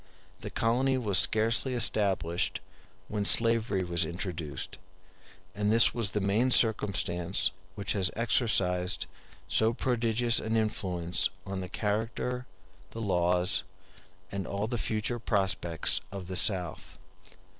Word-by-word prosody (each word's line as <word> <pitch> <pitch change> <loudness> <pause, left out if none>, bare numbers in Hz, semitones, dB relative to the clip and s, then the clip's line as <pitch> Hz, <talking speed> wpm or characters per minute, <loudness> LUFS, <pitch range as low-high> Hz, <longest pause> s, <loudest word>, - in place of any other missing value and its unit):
The - - -6
colony 130 +4 +1
was 105 -6 +1
scarcely 115 +8 +2
established 95 -7 0 0.5
when 105 -1 -2
slavery 115 -3 +3
was 85 -1 0
introduced, 85 -6 -5
*d - - -11 0.7
and 105 0 0
this 115 -1 +5
was 115 -4 -1
the 105 - -1
main 105 +6 +2
circumstance 100 -7 +2 0.2
which 100 - -1
has 95 -2 +2
exercised 95 -6 +1 0.4
so 110 +1 +3
prodigious 120 -1 +1
an 110 +1 -1
influence 90 -5 0 0.2
on 95 -1 -4
the 90 -1 -5
character, 115 +5 -2 0.4
the 115 - -8
laws, 90 -3 +2 0.7
and 100 -1 -4
all 100 +1 -2
the 120 +1 -3
future 110 +3 -2
prospects 95 -6 0
of 95 -2 -6
the 95 - -3
South. 90 -4 0
105 Hz, 125 wpm, -29 LUFS, 90-115 Hz, 0.7 s, this